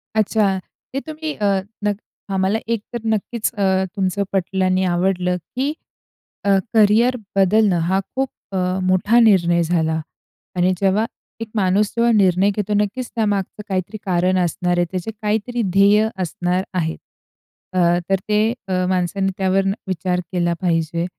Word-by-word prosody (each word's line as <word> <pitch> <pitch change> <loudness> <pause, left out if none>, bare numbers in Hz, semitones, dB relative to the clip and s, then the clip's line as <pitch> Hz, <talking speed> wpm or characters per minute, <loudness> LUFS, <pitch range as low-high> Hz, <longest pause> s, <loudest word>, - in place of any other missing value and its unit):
अच्छा. 205 -3 +2 0.3
ते 275 - 0
तुम्ही 310 -1 -4
अ, 210 - -2 0.4
नक 205 -1 +1 0.4
आम्हाला 190 +3 +1
एक 230 -3 0
तर 240 - -2
नक्कीच 220 +2 -2
अ, 190 -2 +1
तुमचं 195 +1 0
पटलं 190 0 0
आणि 185 0 +2
आवडलं 180 0 +1 0.2
की 275 +4 0 0.7
अ, - - +2 0.2
करियर 225 +4 +4 0.2
बदलणं 195 -1 +3
हा 190 +1 +2 0.2
खूप 265 0 0 0.2
अ, 190 - -2 0.3
मोठा 185 +5 +3
निर्णय 175 -6 +4
झाला. 160 -1 0 0.6
आणि 180 +1 +3
जेव्हा 195 +3 +2 0.4
एक 225 - -3
माणूस 195 +1 +3
जेव्हा 235 0 +3
निर्णय 190 0 +4
घेतो 210 0 -1
नक्कीच 210 +5 -1
त्यामागचं 205 -2 -1
काहीतरी 190 +2 -2
कारण 185 0 +2
असणार 175 0 0
आहे. 175 - +3
त्याचे 185 +4 -3
काहीतरी 220 +3 -1
ध्येय 205 +2 +5 0.2
असणार 180 +2 -1
आहे. 160 -1 -1 0.8
अ, 185 - +1 0.3
तर 195 - +4
ते 215 +2 +2 0.4
माणसाने 190 +1 0
त्यावर 195 0 +1 0.2
विचार 180 0 -1
केला 175 -1 +1
पाहिजे. 170 -1 0
195 Hz, 140 wpm, -20 LUFS, 180-215 Hz, 0.8 s, ध्येय